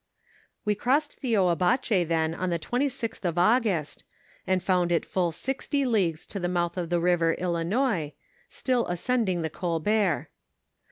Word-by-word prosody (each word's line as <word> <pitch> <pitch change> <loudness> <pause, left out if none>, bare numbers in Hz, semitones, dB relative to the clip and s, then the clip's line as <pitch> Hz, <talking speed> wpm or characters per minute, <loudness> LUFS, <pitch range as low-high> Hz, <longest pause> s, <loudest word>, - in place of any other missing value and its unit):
"We 210 - +2
crossed 280 +8 0
the 250 -4 -1
Oiiabache 180 - +2
then 160 -1 +1
on 185 +2 -2
the 170 - 0
26th 245 - -2
of 175 -2 -1
August, 195 - +2 0.4
and 185 -1 +1
found 180 -2 +2
it 170 - +1
full 180 -3 0
sixty 270 - -2
leagues 185 -10 +1
to 200 - -6
tlie 175 -1 -1
mouth 175 0 -1
of 175 -3 -3
the 175 0 +1
river 170 -1 +2
Ilinois, 175 - 0 0.4
still 250 -2 0
ascending 185 -1 0
the 160 - -3
Colbert. 180 +2 0
180 Hz, 150 wpm, -27 LUFS, 170-230 Hz, 0.4 s, We